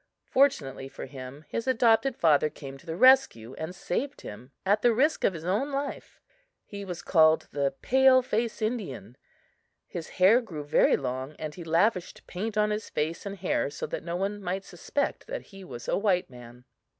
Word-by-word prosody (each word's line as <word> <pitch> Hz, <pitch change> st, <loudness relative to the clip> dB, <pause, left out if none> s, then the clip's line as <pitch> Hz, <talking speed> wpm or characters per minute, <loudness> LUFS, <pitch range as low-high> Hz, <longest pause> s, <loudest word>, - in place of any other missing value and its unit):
Fortunately 140 Hz, -, +1 dB
for -, -, -8 dB
him, 135 Hz, +2 st, -10 dB
his 230 Hz, +2 st, -4 dB
adopted 240 Hz, +1 st, +3 dB
father 155 Hz, -2 st, +4 dB
came 135 Hz, -2 st, -10 dB
to 170 Hz, -, -20 dB
the 160 Hz, -, -3 dB
rescue, 255 Hz, -, +4 dB
and 160 Hz, +5 st, -6 dB
saved 275 Hz, +11 st, -3 dB
him 120 Hz, +6 st, -10 dB
at 205 Hz, +2 st, +3 dB
the 240 Hz, -2 st, +4 dB
risk 295 Hz, +7 st, +2 dB
of -, -, +3 dB
his 165 Hz, 0 st, -8 dB
own 210 Hz, +11 st, 0 dB
life. 280 Hz, +1 st, -5 dB, 0.5 s
He 200 Hz, -1 st, -8 dB
was 175 Hz, -3 st, -6 dB
called 160 Hz, -2 st, +4 dB
the 140 Hz, -1 st, -1 dB
"pale 265 Hz, 0 st, +5 dB
face 230 Hz, -2 st, -2 dB
Indian." 210 Hz, -, -4 dB, 0.7 s
His 165 Hz, -, -7 dB
hair 200 Hz, +7 st, +6 dB
grew 165 Hz, -11 st, -7 dB
very 145 Hz, -, +3 dB
long 130 Hz, +2 st, -4 dB
and 155 Hz, -1 st, -5 dB
he 175 Hz, -, -9 dB
lavished 175 Hz, +3 st, 0 dB
paint 210 Hz, +4 st, -4 dB
on 210 Hz, 0 st, +2 dB
his 210 Hz, +1 st, -3 dB
face 160 Hz, +6 st, -3 dB
and 200 Hz, 0 st, -6 dB
hair 180 Hz, -6 st, 0 dB
so -, -, -5 dB
that -, -, -5 dB
no 170 Hz, +1 st, -4 dB
one 200 Hz, +3 st, -2 dB
might 190 Hz, +1 st, -3 dB
suspect 235 Hz, -, -3 dB
that -, -, -5 dB
he 195 Hz, 0 st, -10 dB
was 120 Hz, -9 st, -9 dB
a -, -, +1 dB
white 190 Hz, -7 st, +1 dB
man. 125 Hz, 0 st, -13 dB
180 Hz, 185 wpm, -28 LUFS, 150-225 Hz, 0.7 s, hair